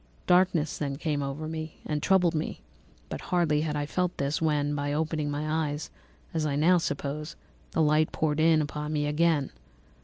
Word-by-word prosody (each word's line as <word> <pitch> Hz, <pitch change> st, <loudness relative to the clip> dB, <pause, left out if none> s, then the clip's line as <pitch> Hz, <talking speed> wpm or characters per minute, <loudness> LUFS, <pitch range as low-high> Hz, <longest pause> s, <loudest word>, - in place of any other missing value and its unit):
Darkness 180 Hz, -4 st, +3 dB
then 140 Hz, -2 st, -2 dB
came 150 Hz, 0 st, -1 dB
over 140 Hz, +3 st, -4 dB
me 160 Hz, 0 st, -6 dB
and 150 Hz, -1 st, -2 dB
troubled 180 Hz, -2 st, +3 dB
me, 155 Hz, 0 st, -3 dB, 0.5 s
but -, -, -5 dB
hardly 165 Hz, -5 st, +2 dB
had 155 Hz, -1 st, -1 dB
I 145 Hz, 0 st, -1 dB
felt 180 Hz, +3 st, -1 dB
this 140 Hz, +3 st, -1 dB
when, 150 Hz, -2 st, +1 dB
by 145 Hz, 0 st, -1 dB
opening 155 Hz, -1 st, -1 dB
my 155 Hz, +1 st, -1 dB
eyes, 145 Hz, +1 st, -5 dB, 0.4 s
as 160 Hz, -1 st, 0 dB
I 145 Hz, -2 st, 0 dB
now 175 Hz, +5 st, +4 dB
suppose, 150 Hz, 0 st, -3 dB, 0.4 s
the 160 Hz, -, +3 dB
light 155 Hz, +1 st, +3 dB
poured 155 Hz, -1 st, 0 dB
in 160 Hz, -1 st, +5 dB
upon 150 Hz, +1 st, -4 dB
me 150 Hz, -1 st, 0 dB
again. 150 Hz, -1 st, +2 dB
155 Hz, 180 wpm, -28 LUFS, 145-160 Hz, 0.5 s, in